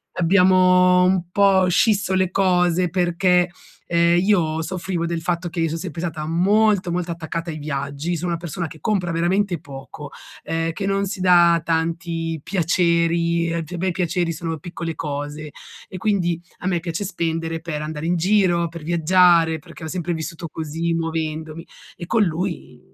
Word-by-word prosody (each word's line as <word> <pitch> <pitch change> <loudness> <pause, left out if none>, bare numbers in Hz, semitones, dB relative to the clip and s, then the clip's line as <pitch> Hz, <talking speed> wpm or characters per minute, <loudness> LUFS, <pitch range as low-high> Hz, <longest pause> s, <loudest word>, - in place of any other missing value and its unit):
abbiamo 180 0 +4
un 180 -2 +1
po' 195 -2 +4
scisso 195 0 +2
le 185 -1 +2
cose 180 -2 +2
perché, 180 0 +2 0.4
ehm, 170 0 +3
io 170 -5 +1
soffrivo 180 0 -3
del 170 -1 -3
fatto 175 +1 -2
che 170 - -6
io 165 - +1
son 160 - -3
sempre 165 -2 -6
stata 165 -3 -4
molto 195 +2 +2
molto 175 0 -2
attaccata 165 0 -5
ai 155 - -6
viaggi, 140 +3 -3
sono 175 +2 -3
una 170 - -1
persona 170 0 -4
che 155 - -12
compra 180 0 -1
veramente 175 +2 0
poco, 145 0 -10 0.3
ehm, 165 0 -1
che 195 - -4
non 195 0 0
si 190 0 -5
da 175 -2 +5
tanti 165 0 -2
piaceri, 170 -1 +1
ehm, 170 0 -2
pe 175 +3 -7
me 185 +2 -1
i - - +1
piaceri 175 -1 -1
sono 165 0 -4
piccole 170 +1 -5
cose 145 0 -5 0.4
e 185 - -8
quindi 180 -4 0 0.2
a - - -4
me 180 -2 +1
piace 170 +2 -4
spendere 165 -3 -2
per 160 -2 -5
andare 155 0 -5
in 175 - +1
giro, 175 -1 +2
per 170 -1 -9
viaggiare, 170 0 +4
perché 150 - -13
ho - - -4
sempre 175 +1 -3
vissuto 160 +1 -6
così 165 +2 -3
muovendomi, 160 0 -3 0.3
e 175 - -7
con 220 +5 +2
lui, 175 0 -3
170 Hz, 170 wpm, -21 LUFS, 165-180 Hz, 0.4 s, da